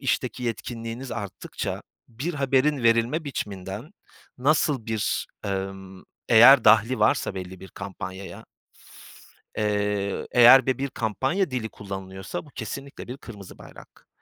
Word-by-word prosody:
işteki 125 -2 -1
yetkinliğiniz 115 +1 -5
arttıkça, 100 -2 -5 0.3
bir 135 +9 -4
haberin 135 0 +1
verilme 115 +7 +2
biçiminden 105 - -6 0.5
nasıl 140 -2 +1
bir, 110 -3 -1 0.2
emm 95 -1 -5 0.3
Eğer 120 +4 +8
dahli 115 +3 +5
varsa 105 -2 +2
belli 95 -1 -7
bir 95 - -10
kampanyaya 95 -1 -8 1.1
eee, 105 -2 -1
eğer 125 +1 +8
de 130 - +1
bir 140 +1 -2
kampanya 135 - -1
dili 120 -3 -3
kullanılıyorsa, 95 +1 -7
bu - - -16
kesinlikle 140 +2 -7
bir 125 +3 -6
kırmızı 100 -8 -11
bayrak. - - -15
115 Hz, 120 wpm, -25 LUFS, 100-130 Hz, 1.1 s, Eğer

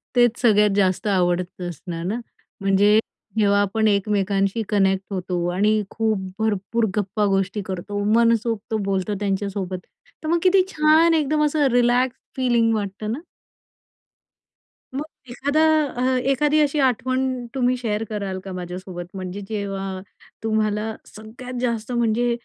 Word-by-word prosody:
तेच 240 -1 +4
सगळ्यात 210 -3 +5
जास्त 190 0 +1
आवडतं 180 -1 0
असणार 170 0 -6
ना. 215 +6 -1 0.4
म्हणजे 200 +2 +4 0.4
जेव्हा 200 -1 +4
आपण 220 +2 +1
एकमेकांशी 200 0 +1
कनेक्ट 195 -2 +2
होतो 180 -2 -2
आणि 210 +4 +2
खूप 220 -2 0 0.2
भरपूर 220 +1 0
गप्पा 210 +1 0
गोष्टी 195 +1 0
करतो, 200 +2 -4
मनसोक्त 230 -1 +2
बोलतो 195 +1 -1
त्यांच्यासोबत, 195 -2 -2 0.5
तर - - -4
मग 340 - +3
किती 370 0 +5
छान 315 0 +4
एकदम 305 -1 +2
असं 295 -1 +2
रिलॅक्स 245 +1 +2 0.2
फिलिंग 240 -3 +2
वाटतं 210 +1 -3
ना? 250 - -3 1.8
मग 285 - -1 0.3
एखादा 285 +5 0 0.3
अ, 255 0 0
एखादी 295 +3 +2
अशी 295 0 +1
आठवण 255 +2 0 0.3
तुम्ही 255 -1 +2
शेअर 225 -3 -2
कराल 200 -3 -3
का 190 - -6
माझ्यासोबत? 180 0 -6
म्हणजे 185 +1 -5
जेव्हा 195 -2 -4 0.4
तुम्हाला 215 0 0
सगळ्यात 240 +4 -9
जास्त 235 -1 -2
म्हणजे 240 0 +1
215 Hz, 130 wpm, -22 LUFS, 195-245 Hz, 1.8 s, सगळ्यात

